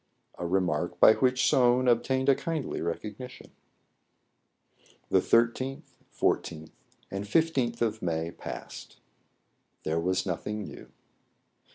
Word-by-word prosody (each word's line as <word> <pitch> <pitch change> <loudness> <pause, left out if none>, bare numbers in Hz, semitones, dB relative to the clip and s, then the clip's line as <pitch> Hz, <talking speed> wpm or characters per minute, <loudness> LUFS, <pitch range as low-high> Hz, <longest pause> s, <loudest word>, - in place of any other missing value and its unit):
A 85 - -2
remark 85 -3 0
by - - +8
which 125 +1 +2
Soun 125 0 +4
obtained 130 +2 +2
a 140 - +7
kindly 160 +1 -3
recognition. 105 +9 -6 1.6
The - - +4
13th, 120 +3 +1 0.4
14th, 80 -1 -1 0.4
and 95 +1 -3
isth 125 -1 +1
of 110 -1 -1
May 80 -1 -2
passed. - - -9 0.9
There 80 +1 0
was 95 +2 0
nothing 105 +3 -3
new. - - -10
110 Hz, 105 wpm, -28 LUFS, 90-130 Hz, 1.6 s, by